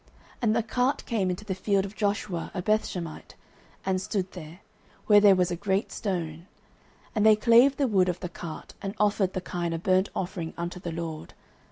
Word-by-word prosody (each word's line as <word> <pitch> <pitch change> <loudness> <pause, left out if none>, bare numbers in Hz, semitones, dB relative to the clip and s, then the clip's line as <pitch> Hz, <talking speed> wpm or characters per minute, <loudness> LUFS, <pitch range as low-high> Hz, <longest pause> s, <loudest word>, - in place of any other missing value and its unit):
09:006:014 - - -30 0.3
And 220 -2 +2
the 230 - +2
cart 250 +4 0
came 205 -6 0
into 180 +3 -4
the 195 - -2
field 195 +1 +1
of 200 +1 -9
Joshua, 200 -4 -1
a 180 - -2
Bethshemite, 180 -6 -2 0.5
and 190 -1 0
stood 190 -1 -2
there, 170 0 -10 0.4
where 210 -1 +7
there 200 -2 +7
was 180 -1 +1
a - - 0
great 195 +3 -1
stone: 170 -4 -4 0.7
and 215 - +1
they 215 0 +7
clave 240 +5 +5
the 280 - +2
wood 190 -5 +3
of 180 0 -2
the 180 - -4
cart, 170 -2 -8
and 195 0 -4
offered 205 -2 +2
the 185 - -2
kine 175 -2 -3
a - - -1
burnt 185 +3 +2
offering 175 -3 -4
unto 175 +1 -4
the 175 -1 -5
LORD. 160 -1 -6
190 Hz, 200 wpm, -27 LUFS, 175-210 Hz, 0.7 s, where